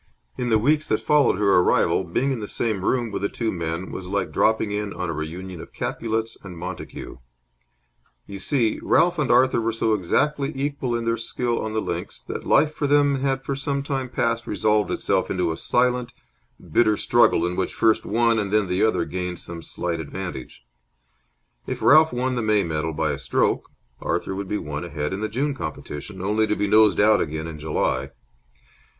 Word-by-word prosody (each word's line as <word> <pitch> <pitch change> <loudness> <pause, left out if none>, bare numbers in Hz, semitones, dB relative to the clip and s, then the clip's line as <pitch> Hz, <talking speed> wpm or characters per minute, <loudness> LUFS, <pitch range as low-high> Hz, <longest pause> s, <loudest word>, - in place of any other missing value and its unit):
In 125 - -2
the 110 - +4
weeks 150 +7 +2
that 110 - +1
followed 145 -10 +3
her 100 -3 +4
arrival, 90 - +3
being 135 +11 -1
in 130 - -2
the 105 - -5
same 105 -4 -2
room 120 +1 0
with - - -3
the 100 - 0
two 115 -2 -2
men 85 +1 -4
was 95 - -6
like 100 +1 -2
dropping 110 -1 +2
in 105 -1 -3
on 90 -2 -3
a - - -3
reunion 85 +3 -6
of - - -12
Capulets 115 0 -3
and 90 -3 -10
Montagues. 90 -6 -7 1.1
You 100 -1 -8
see, 115 +1 +1
Ralph 170 0 +3
and 150 - 0
Arthur 125 -1 +4
were 115 0 0
so 110 0 +1
exactly 140 - +1
equal 135 -3 -2
in 115 0 -2
their 115 0 +1
skill 120 +1 -2
on 110 0 -4
the 110 - 0
links - - -5
that - - -6
life 155 0 +4
for 145 - -1
them 145 -1 +3
had 135 -1 0
for 140 - -2
some 140 0 -2
time 135 -2 -3
past 115 -1 -1
resolved 105 +1 +1
itself - - 0
into 90 -3 0
a - - -3
silent, 125 +2 +1 0.6
bitter 110 -3 +3
struggle 120 -8 +3
in 90 0 -2
which - - -2
first 110 -1 +3
one, 115 +1 +2
then 105 0 +2
the 90 +1 -1
other, 110 - +2
gained 90 -1 -4
some 85 -1 -8
slight 85 0 -3
advantage. 80 -6 -7 1.0
If - - -4
Ralph 155 +1 +6
won 125 +1 -1
the 120 - -1
May 105 -2 +2
medal 80 -1 -2
by - - 0
a - - -4
stroke, - - 0 0.3
Arthur - - -2
would 100 0 -4
be 105 - 0
one 75 -2 -5
ahead 75 -1 -3
in 95 - -3
the 110 0 -2
June 140 +6 -1
competition, 80 - -7
only 110 +2 +1
to 105 - +1
be 105 - 0
nosed 105 -2 +5
out 105 +1 +5
again 80 0 -3
in 80 -2 -7
July. 75 -4 -1
110 Hz, 195 wpm, -23 LUFS, 90-125 Hz, 1.1 s, Ralph